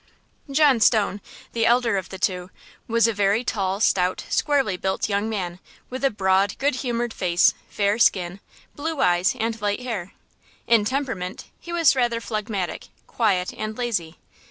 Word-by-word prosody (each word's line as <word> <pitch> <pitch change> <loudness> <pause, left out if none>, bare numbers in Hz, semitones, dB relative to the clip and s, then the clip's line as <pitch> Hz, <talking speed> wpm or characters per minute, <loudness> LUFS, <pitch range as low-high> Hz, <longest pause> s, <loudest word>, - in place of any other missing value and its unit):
John 280 -3 +4
Stone, 215 -3 +3 0.3
the 230 -1 +2
elder 235 -2 +3
of 190 -2 -3
the 190 - -7
two, 180 -1 -1 0.4
was 230 0 +3
a 230 - 0
very 205 +3 +1
tall, 195 -5 -1
stout, 185 -3 +1
squarely 275 -10 +1
built 190 +1 -1
young 205 +1 -1
man, 180 -5 -4 0.3
with 255 +2 -5
a 275 - +4
broad, 195 -2 +1
good 280 -1 0
humored 240 -2 -2
face, 175 -1 +3 0.2
fair 205 +2 0
skin, 180 -3 +2 0.4
blue 315 0 -4
eyes 175 +5 +3
and 225 -1 -2
light 205 +2 -1
hair. 210 -7 -5 0.5
In 225 -3 +4
temperament 220 -8 -3
he 345 - -9
was 335 -5 +4
rather 240 -2 +1
phlegmatic, 215 -6 -4 0.2
quiet 195 -6 0
and 215 0 -5
lazy. 200 -10 -2
215 Hz, 155 wpm, -23 LUFS, 190-240 Hz, 0.5 s, John